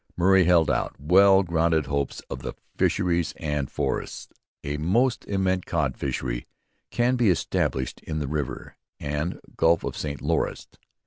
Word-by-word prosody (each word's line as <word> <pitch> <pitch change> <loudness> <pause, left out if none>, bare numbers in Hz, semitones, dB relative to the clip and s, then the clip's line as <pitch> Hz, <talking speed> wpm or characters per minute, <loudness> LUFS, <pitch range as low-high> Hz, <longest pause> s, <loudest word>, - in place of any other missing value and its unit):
Murray 95 +1 +5
held 85 -2 +4
out - - -1
well 95 +6 +5
grounded 80 -3 +1
hopes 70 -2 -2
of - - -7
the - - -6 0.2
fisheries 85 -2 +1
and 75 -3 -2
forests. - - -3 0.3
'A 70 +1 -3
Most 115 - +1
immense 95 -2 0
Cod 75 -6 0
Fishery 60 -2 -3 0.4
can 120 +1 +1
be 120 -4 +3
established 65 -6 -1
in 80 - -5
the 75 -2 -2
River 70 -4 -4 0.2
and 75 +4 -3 0.2
Gulph 85 0 +3
of - - -4
St 70 -1 -4
Lawrence. - - -1
80 Hz, 145 wpm, -25 LUFS, 70-95 Hz, 0.4 s, Murray